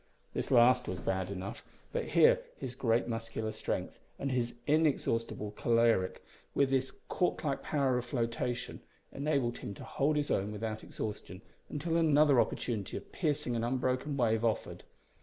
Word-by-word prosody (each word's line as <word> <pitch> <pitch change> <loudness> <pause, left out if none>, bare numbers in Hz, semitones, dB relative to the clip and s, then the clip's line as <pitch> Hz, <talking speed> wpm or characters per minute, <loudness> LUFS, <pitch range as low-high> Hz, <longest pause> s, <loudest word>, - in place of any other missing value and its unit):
This - - -2
last 125 0 +5
was 90 - -3
bad 95 -1 -1
enough, 100 +3 -5 0.3
but - - -1
here - - +5 0.2
his 125 - -5
great 120 -3 +1
muscular 115 -1 -3
strength 110 - -3 0.2
and 140 - -2
his 120 -2 -1
inexhaustible 135 -8 +1
caloric, 115 -4 +2 0.3
with 140 -1 +3
his 135 0 +2 0.2
cork 180 - 0
like 140 -3 -1
power 135 -4 +1
of 125 - -6
flotation, 120 0 -2 0.3
enabled 140 -4 0
him 100 - -6
to - - -9
hold 150 +3 0
his 145 -1 0
own 100 +2 +1
without 110 +1 -4
exhaustion 105 -2 -6 0.3
until 165 +3 -1
another 150 -5 +5
opportunity 105 -6 -2
of - - -10
piercing 150 -7 0
an 115 - -1
unbroken 130 +3 0
wave 115 -3 +2
offered. 115 -2 -1
120 Hz, 155 wpm, -32 LUFS, 115-140 Hz, 0.3 s, last